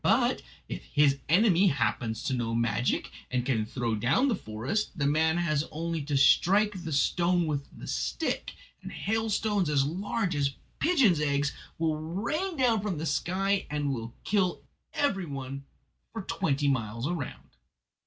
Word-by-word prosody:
But - - +3 0.3
if - - -6
his 140 - +3
enemy 190 +1 +5
happens 120 - 0
to - - -1
know 115 -2 -1
magic, 115 +1 0 0.2
and 125 -1 -1
can 110 -5 0
throw 120 -1 -2
down 130 - +2
the 235 - +2
forest, 120 - -3
the 140 - 0
man 160 +3 +3
has 155 -4 +1
only 165 +1 -2
to 145 -1 0
strike 195 +8 +4
the 165 - -5
stone 175 +4 +2
with 145 -3 -2
the - - -9
stick, - - -2 0.3
and - - -8
hailstones 210 -3 0
as 140 -2 +3
large 185 +3 -1
as 140 -1 0 0.2
pigeons' 265 - +4
eggs 140 -1 +1 0.2
will 160 -1 0
rain 235 - -2
down 235 -5 +3
from 200 -5 -2
the 155 - -3
sky 190 +6 0
and 145 -2 -1
will 115 -1 -6
kill 190 -3 +1 0.3
every 195 -11 0
one 135 -1 -6 0.5
for 225 -3 -4
twenty 145 -7 0
miles 115 -2 -1
round." 165 -6 -5
155 Hz, 155 wpm, -29 LUFS, 135-195 Hz, 0.5 s, enemy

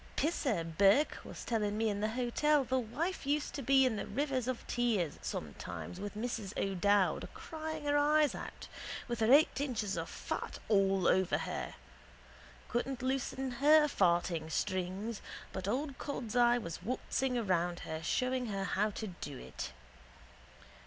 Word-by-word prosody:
Pisser 275 - +1
Burke 195 - +3
was - - -8
telling 210 -3 0
me 225 0 +2
in 205 -1 -1
the 215 +1 0
hotel 255 +5 +2
the 260 +1 +1
wife 275 +8 -3
used 295 +1 0
to 285 - -4
be 270 +1 +5
in 225 -5 -2
rivers 265 -3 0
of 255 -2 -3
tears 220 -10 0
some - - -4
times 180 - -6
with 205 +1 -5
Mrs 220 -3 -4
O'Dowd 195 0 +2
crying 315 -1 -5
her 290 0 +2
eyes 300 0 +4
out - - -7 0.4
with 240 -2 -3
her 220 +2 +3
eight 285 0 +6
inches 225 -8 -1
of - - -3
fat - - -4
all 195 -3 +3
over 190 -1 +3
her. - - -4 0.9
Couldn't 250 +1 -2
loosen 265 0 -1
her 305 +1 +7
farting 170 - +1
strings 185 +6 -2 0.3
but 185 - -4
old 270 +6 -1
cod's 250 -5 -4
eye 240 0 +5
was 170 -8 -5
waltzing 250 +4 -1
around 175 -5 0
her 160 0 -5
showing 255 +8 0
her 195 -2 -2
how 200 +2 +1
to 215 +1 -5
do 170 -8 -7
it. - - -6
235 Hz, 155 wpm, -33 LUFS, 195-270 Hz, 0.9 s, her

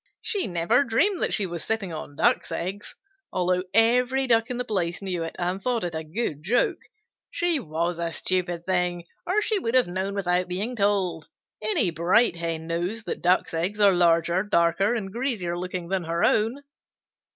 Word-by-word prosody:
She 405 -3 -1
never 180 +9 +2
dreamed 310 - +2
that - - 0
she 205 - +1
was 170 -2 -5
sitting 210 -6 -2
on 150 -2 -7
Ducks' - - +1
eggs, 195 +4 -5 0.4
although 180 0 +1
every 250 +5 +4
Duck 230 -2 +2
on 250 - -3
the 250 - -2
place 180 -6 -2
knew 185 -4 -3
it 165 - -6
and 180 +2 -2
thought 240 -1 -1
it 175 -2 -3
a 160 0 -4
good 155 -2 -4
joke. 220 +10 +1 0.5
She 345 -3 +1
was 170 - -3
a 170 -1 -2
stupid 175 -1 -1
thing, 180 -2 0 0.2
or 410 +4 +1
she 430 -1 +1
would 230 -8 -2
have 255 - +5
known 190 +3 -3
without 180 -2 0
being 200 +8 -3
told. 195 -6 0 0.3
Any 215 -3 +3
bright 175 +7 +3
Hen 165 -1 -1
knows 175 +7 -3
that - - -5
Ducks' 180 0 +2
eggs 180 +6 -2
are 200 -2 +6
larger, 170 0 +3
darker, 195 +2 +2
and 195 -4 -5
greasier 225 -9 -2
looking 180 -1 -5
than 190 -3 -1
her 170 +1 -1
own." 230 +6 +1
185 Hz, 185 wpm, -25 LUFS, 170-225 Hz, 0.5 s, are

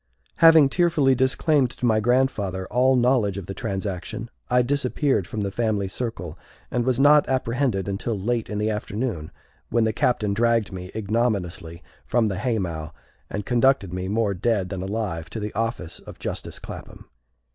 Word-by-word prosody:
Having 160 -4 +7
tearfully 160 -4 +3
disclaimed 130 +1 +2
to 125 - -5
my 110 -2 +3
grandfather 110 -6 +1
all 130 +3 +3
knowledge 120 -6 +2
of 100 - -5
the 95 - -6
transaction, 100 +4 -4 0.2
I 125 0 +4
disappeared 135 - 0
from 105 +1 -4
the 100 -1 -2
family 105 -2 0
circle, 95 -6 -5 0.3
and 120 - 0
was 130 -1 +1
not 145 +1 +5
apprehended 125 -5 0
until 100 +3 -2
late 115 +3 -1
in 105 - -3
the 105 +1 0
afternoon, 105 -5 -3 0.4
when 115 0 +2
the 110 0 +1
Captain 105 -3 +1
dragged 115 0 +2
me 90 -1 -7
ignominiously 100 -6 -2 0.2
from 115 -2 +1
the 95 - -3
haymow 85 -10 -2 0.4
and 105 -1 -4
conducted 125 -6 +2
me, 90 0 -3
more 105 0 +1
dead 100 -1 0
than 95 -1 -4
alive, 95 -5 -3
to 110 - -5
the 105 0 -4
office 115 -6 -3
of - - -12
justice - - -5
Clapham. - - -10
110 Hz, 165 wpm, -24 LUFS, 95-125 Hz, 0.4 s, Having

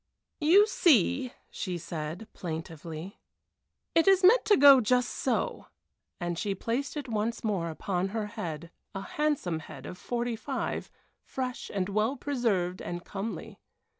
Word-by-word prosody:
"You 355 +7 +6
see," 260 - +3 0.2
she 185 -3 -3
said, 165 +4 -5
plaintively, 165 +1 -6 0.7
"it 330 +3 +4
is 385 -1 +6
meant 450 +7 +7
to 415 - +5
go 275 -2 +9
just 250 +2 +2
so," - - -1 0.5
and 175 -2 -2
she 200 -2 -1
placed 245 +9 -2
it 290 - -4
once 225 0 -2
more 195 -7 0
upon 180 +3 -2
her 215 +2 -3
head, 170 -7 -6 0.2
a 195 - -3
handsome 280 - -1
head 145 -4 -10
of 180 - -8
forty 240 -1 -2
five, 220 - -3 0.3
fresh 255 -2 -4
and 190 -2 -1
well 215 +6 +1
preserved 215 -12 -1
and 175 0 -5
comely. 205 +1 -6
210 Hz, 140 wpm, -29 LUFS, 175-255 Hz, 0.7 s, go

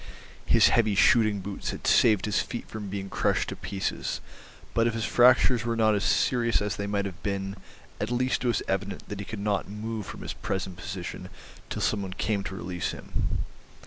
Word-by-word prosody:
His - - +6
heavy 110 -3 +3
shooting 105 0 +4
boots 100 +1 -5
had - - -5
saved 105 -5 +5
his 105 -2 +1
feet 120 - -4
from 110 -2 -6
being 100 0 -4
crushed - - 0
to - - -4
pieces, 95 -1 -3 0.5
but 115 0 +3
if 115 - -1
his 115 -1 -1
fractures 125 -1 +5
were 115 0 0
not 110 -1 +4
as 100 -1 0
serious 115 +3 +2
as 105 0 -2
they 100 - -3
might 100 -1 0
have 95 -3 -6
been, 100 -1 -2 0.4
at 105 - -2
least 125 +2 0
it - - +1
was 120 -4 +1
evident 100 +1 -2
that 105 - -5
he 100 - -4
could 110 - -6
not 100 -1 -1
move 105 0 -4
from - - -8
his - - -4
present 95 -1 -3
position 95 0 -6 0.4
till - - -3
some 105 - +1
one 95 -2 -5
came 100 +1 -1
to 95 - -4
release 90 -1 -3
him. - - -3
105 Hz, 205 wpm, -27 LUFS, 100-115 Hz, 0.5 s, His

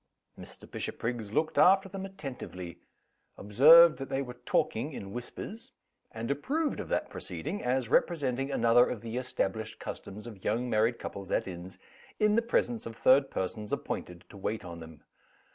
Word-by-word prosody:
Mr. - - -10
Bishopriggs 115 -3 -4
looked 155 +7 +1
after 195 +1 +6
them 195 0 -6
attentively 125 - -8 0.6
observed 155 +11 +7
that 135 - -5
they 135 +1 -1
were 125 -2 -8
talking 130 +7 0
in 100 -5 -7
whispers 220 - -7 0.4
and 115 +3 -4
approved 290 - -1
of - - -6
that - - -1
proceeding, 205 - -5
as 125 0 0
representing 135 -2 +1
another 120 -1 +4
of 115 - -4
the 115 +1 -5
established 110 -4 -2
customs 105 +3 -8
of 110 -5 -10
young 115 +4 0
married 115 +1 +2
couples 100 -1 -7
at - - 0
inns, 90 0 -8 0.4
in 210 -1 +4
the 230 - +4
presence 120 - 0
of 115 - -8
third 135 +4 +4
persons 100 +3 -4
appointed 90 -1 -4
to 100 - -13
wait 105 +1 -3
on 85 -1 -8
them. 80 -2 -12
120 Hz, 160 wpm, -30 LUFS, 105-145 Hz, 0.6 s, observed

